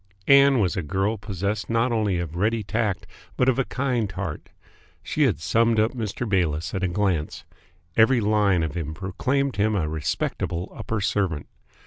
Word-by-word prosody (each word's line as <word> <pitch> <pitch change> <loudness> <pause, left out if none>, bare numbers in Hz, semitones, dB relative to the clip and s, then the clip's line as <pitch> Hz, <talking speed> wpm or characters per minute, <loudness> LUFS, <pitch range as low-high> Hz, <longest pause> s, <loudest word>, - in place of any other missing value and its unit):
Ann 140 0 +7
was 100 -4 +1
a 95 - -1
girl 95 +8 -1
possessed 100 -1 -3
not 115 +2 +1
only 105 -5 +1
of 85 -2 -4
ready 110 +4 0
tact 105 -2 -1 0.3
but 125 - +2
of 130 0 +3
a - - +3
kind 125 -6 -1
heart. 95 -5 -5 0.5
She - - +1
had - - +1
summed 115 +7 +2
up 110 +2 +3
Mr. 115 -1 -4
Bayliss 85 -5 0
at 95 - -2
a 95 - +1
glance. 90 -4 -1 0.5
Every 120 +3 +5
line 105 -5 +2
of 80 -3 -3
him 80 -3 -4
proclaimed 130 - -1
him 105 +1 +2
a 85 -6 0
respectable 80 +3 -3
upper 110 -2 -3
servant. 95 -7 0
100 Hz, 170 wpm, -24 LUFS, 90-115 Hz, 0.5 s, Ann